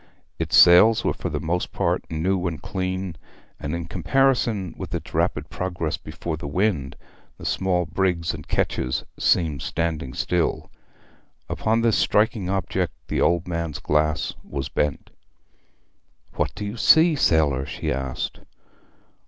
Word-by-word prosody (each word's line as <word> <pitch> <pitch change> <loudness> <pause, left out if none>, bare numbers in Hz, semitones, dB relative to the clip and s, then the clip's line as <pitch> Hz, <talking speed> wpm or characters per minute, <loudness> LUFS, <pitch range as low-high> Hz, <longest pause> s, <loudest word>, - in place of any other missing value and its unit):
Its - - +2
sails 90 +6 +7
were - - +1
for - - -4
the 75 - -2
most 85 +4 -2
part - - 0
new 90 +3 0
and 80 -3 -5
clean, 95 -2 -3 0.4
and 75 +4 -3
in 85 -1 -4
comparison 120 -3 +1
with - - -5
its - - -6
rapid - - 0
progress 85 -4 -2
before 85 -2 -5
the 75 - -6
wind 80 -4 0 0.4
the - - -10
small 90 -2 +1
brigs 90 -3 0
and 75 -2 -9
ketches 65 0 -1 0.2
seemed 75 -6 +2
standing 80 -6 -2
still. 90 -2 -1 0.8
Upon 110 +1 0
this 115 -2 +3
striking 105 -3 +2
object 95 0 -1 0.2
the - - 0
old 85 0 +2
man's 85 -3 -3
glass 75 +1 0
was 70 -2 -5
bent. 75 -2 -2 1.2
'What - - -2
do 105 - -5
you 105 +3 -5
see, 160 +6 +6
sailor?' 75 - +2
she 65 - -3
asked. 65 0 -3
85 Hz, 140 wpm, -24 LUFS, 75-95 Hz, 1.2 s, sails